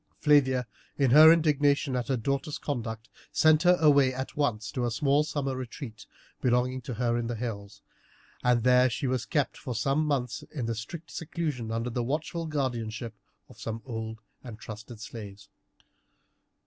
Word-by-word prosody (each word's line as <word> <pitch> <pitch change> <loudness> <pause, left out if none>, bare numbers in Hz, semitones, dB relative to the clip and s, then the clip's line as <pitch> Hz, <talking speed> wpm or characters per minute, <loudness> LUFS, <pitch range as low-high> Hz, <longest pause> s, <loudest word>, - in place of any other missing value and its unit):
Flavia, 130 -4 +3 0.3
in 135 -4 +3
her 155 +4 +10
indignation 145 -3 +2
at 125 -1 -2
her 135 -2 +1
daughter's 140 +5 -2
conduct, 115 -5 -4 0.2
sent 155 -1 +4
her 180 0 +5
away 140 -4 +5
at 130 +1 -5
once 120 -7 -1
to 125 -4 -2
a 120 - +1
small 140 +5 +2
summer 140 -3 -2
retreat 125 -3 -8 0.3
belonging 125 +1 +1
to 125 -1 -6
her 120 0 0
in 115 - -2
the 120 - -3
hills, 105 -3 -6 0.6
and 125 -2 +3
there 125 +1 +5
she 120 - -3
was 125 -5 -1
kept 145 +2 0
for 125 -5 -5
some 135 +7 +1
months 130 -7 -1
in 115 -5 -2
strict 150 +10 -8
seclusion 150 -8 -4
under 115 +2 -2
the 120 +1 -1
watchful 160 +5 -2
guardianship 120 -6 -3 0.3
of - - -17
some 115 0 -5
old 110 -3 -5 0.3
and 120 -4 -8
trusted 110 +1 -9
slaves. 105 -2 -9
125 Hz, 160 wpm, -28 LUFS, 115-145 Hz, 0.6 s, her